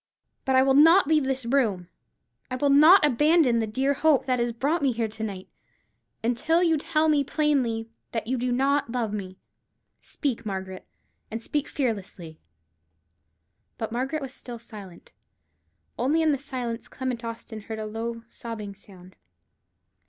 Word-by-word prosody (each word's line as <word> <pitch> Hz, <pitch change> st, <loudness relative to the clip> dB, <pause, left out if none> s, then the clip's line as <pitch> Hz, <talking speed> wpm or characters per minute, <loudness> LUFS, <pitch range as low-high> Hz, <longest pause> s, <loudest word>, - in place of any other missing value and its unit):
But 265 Hz, -, +2 dB
I 260 Hz, -, +6 dB
will 270 Hz, 0 st, +3 dB
not 325 Hz, +6 st, +7 dB
leave 305 Hz, -1 st, +2 dB
this 265 Hz, -2 st, -1 dB
room, 225 Hz, -9 st, +1 dB, 0.6 s
I 255 Hz, -, -3 dB
will 280 Hz, +2 st, +1 dB
not 310 Hz, +5 st, +7 dB
abandon 295 Hz, -2 st, +3 dB
the 220 Hz, -, -1 dB
dear 265 Hz, +6 st, 0 dB
hope 295 Hz, -1 st, +2 dB
that 255 Hz, -2 st, 0 dB
has 235 Hz, 0 st, 0 dB
brought 285 Hz, +8 st, -1 dB
me 275 Hz, -2 st, +2 dB
here 230 Hz, -1 st, -1 dB
to 220 Hz, +1 st, -7 dB
night, 195 Hz, -3 st, -5 dB, 0.8 s
until 285 Hz, +9 st, +1 dB
you 330 Hz, -2 st, +3 dB
tell 310 Hz, +1 st, +1 dB
me 295 Hz, -2 st, +3 dB
plainly 260 Hz, -7 st, 0 dB, 0.2 s
that 225 Hz, -2 st, -3 dB
you 255 Hz, +4 st, -1 dB
do 250 Hz, +1 st, -1 dB
not 275 Hz, +1 st, +1 dB
love 230 Hz, -4 st, -2 dB
me. 190 Hz, -3 st, -6 dB, 0.6 s
Speak, 275 Hz, -6 st, -3 dB
Margaret, 190 Hz, -3 st, -6 dB, 0.4 s
and 225 Hz, -, -4 dB
speak 290 Hz, +5 st, -2 dB
fearlessly." 195 Hz, -, -4 dB, 1.4 s
But 225 Hz, -1 st, -4 dB
Margaret 270 Hz, +5 st, -2 dB
was 265 Hz, -1 st, -7 dB
still 245 Hz, -2 st, -9 dB
silent, 205 Hz, -6 st, -13 dB, 0.9 s
only 295 Hz, +7 st, +2 dB
in 315 Hz, -, +3 dB
the 280 Hz, -, 0 dB
silence 250 Hz, -4 st, -5 dB
Clement 255 Hz, -3 st, -4 dB
Austin 230 Hz, -1 st, -7 dB
heard 220 Hz, +1 st, -7 dB
a 215 Hz, -, -4 dB
low, 230 Hz, +2 st, -5 dB
sobbing 225 Hz, -3 st, -7 dB
sound. 185 Hz, -2 st, -16 dB
245 Hz, 160 wpm, -26 LUFS, 220-280 Hz, 1.4 s, not